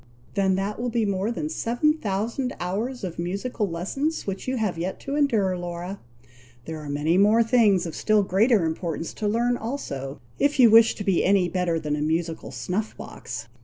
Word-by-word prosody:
"Then 190 -2 +2
that 200 +3 -2
will 245 - -1
be 230 -2 0
more 200 +1 0
than 270 +6 -3
seven 300 0 +1
thousand 235 +1 -2
hours 220 +8 -3
of 175 -3 -5
musical 200 +4 -2
lessons 270 - -2
which 195 +3 -4
you 260 0 0
have 210 -6 0
yet 180 +3 -3
to 275 - -4
endure, 220 -11 +2
Laura! 175 +2 -5 0.7
There 160 -1 -5
are 150 -1 -8
many 150 +5 +1
more 215 +3 +5
things 220 -6 +3
of 165 - -5
still 215 -1 +3
greater 200 +1 +3
importance 165 0 -3
to 210 - -3
learn 240 +3 +1
also, 140 - -5 0.2
if 285 -1 +2
you 235 -4 +8
wish 225 0 +7
to 205 - -5
be 195 -3 +2
any 190 -2 +3
better 175 -2 0
than 150 -1 -2
a 150 - -3
musical 160 -4 -1
snuff 180 - -3
box. - - -7
200 Hz, 190 wpm, -25 LUFS, 175-235 Hz, 0.7 s, you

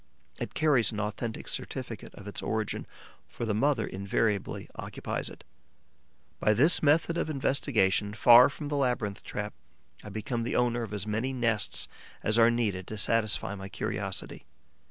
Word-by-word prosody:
It - - -5
carries 140 -9 +3
an 105 - -4
authentic 110 +2 -4
certificate - - -5
of 100 - -11
its 100 - -4
origin, 105 +2 -2 0.4
for 120 - -5
the 110 - 0
mother 125 0 +2
invariably 100 +1 -1
occupies - - -4
it. - - -13 1.0
By 105 - +3
this 150 - +5
method 160 +3 +3
of - - -1
investigation, 115 -8 +1
far 120 +3 +8
from 145 +1 -6
the 145 - -1
labyrinth 120 -7 0
trap, 105 0 -4 0.5
I - - -8
become 110 +3 -3
the 115 - -2
owner 120 0 +2
of 110 -3 -5
as 105 -1 -3
many 110 +5 -1
nests 115 -5 0 0.4
as 110 +2 +3
are 115 0 +7
needed 105 -6 -1
to 110 - -5
satisfy 110 -1 +1
my 95 -1 -7
curiosity. - - -4
110 Hz, 155 wpm, -29 LUFS, 105-125 Hz, 1.0 s, far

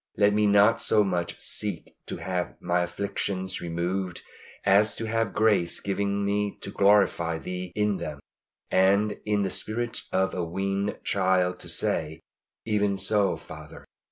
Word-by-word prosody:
Let 105 0 +4
me 105 0 +3
not 105 +3 +5
so 105 -1 +3
much 90 -3 -2
seek 100 -6 -2
to - - -4
have 90 -1 -3
my 90 0 +1
afflictions 95 +1 -2
removed 90 +2 -3 0.4
as 105 +3 +4
to 115 - -4
have 115 -1 0
grace 100 -5 +2
given 100 0 -1
me 105 0 -1
to 100 - -4
glorify 100 -5 +3
Thee 90 +2 -5
in 105 -2 +1
them, 75 -2 -6 0.5
and 100 +2 +3
in 105 -1 +1
the 95 - -1
spirit 115 +4 -2
of 95 0 +1
a 90 - -2
weaned 95 +4 -2
child 95 -2 +1
to - - -10
say, 80 +1 -1 0.5
"Even 105 -2 +1
so, 100 0 +1
Father!" - - -11
100 Hz, 150 wpm, -26 LUFS, 90-105 Hz, 0.5 s, not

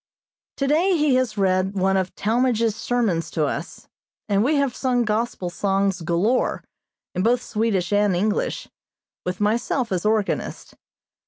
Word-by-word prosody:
Today 320 +7 +2
he 300 -3 +2
has 255 -4 +1
read 190 0 +1
one 190 0 +2
of 185 -1 -1
Talmage's 230 0 +1
sermons 220 -8 -1
to 155 - 0
us, 150 +3 -5 0.4
and 200 0 +2
we 295 +6 +2
have 280 -3 +1
sung 250 -2 +1
Gospel 215 -4 -2
songs 195 0 0
galore, 175 +9 0 0.5
in 185 - -1
both 240 +4 +2
Swedish 210 -4 -1
and 205 -2 +3
English, 205 +4 -1 0.6
with 180 0 -2
myself 230 +3 0
as 180 -2 -1
organist. 215 -1 -1
210 Hz, 140 wpm, -23 LUFS, 190-245 Hz, 0.6 s, and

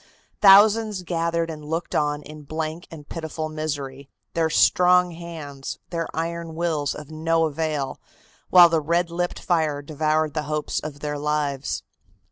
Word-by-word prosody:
Thousands 210 0 +6
gathered 170 -1 -1
and 155 -1 -8
looked 165 +3 -3
on 145 0 0
in 155 +1 -10
blank 155 +3 -5
and 150 -3 -11
pitiful 160 -1 -5
misery, 140 -3 -5 0.2
their 165 -1 +1
strong 180 +2 +4
hands, 160 -5 -7
their 165 -1 -2
iron 165 0 -4
wills 160 -4 -1
of 150 0 -9
no 165 +1 +1
avail, 155 -2 -2 0.5
while 175 -1 +9
the 165 -1 +1
red 170 +3 0
lipped 175 +1 -2
fire 155 -5 0
devoured 155 0 0
the 155 - -1
hopes 150 0 -1
of 150 -1 -8
their 150 -1 -3
lives. 145 -2 -1
160 Hz, 145 wpm, -24 LUFS, 150-170 Hz, 0.5 s, while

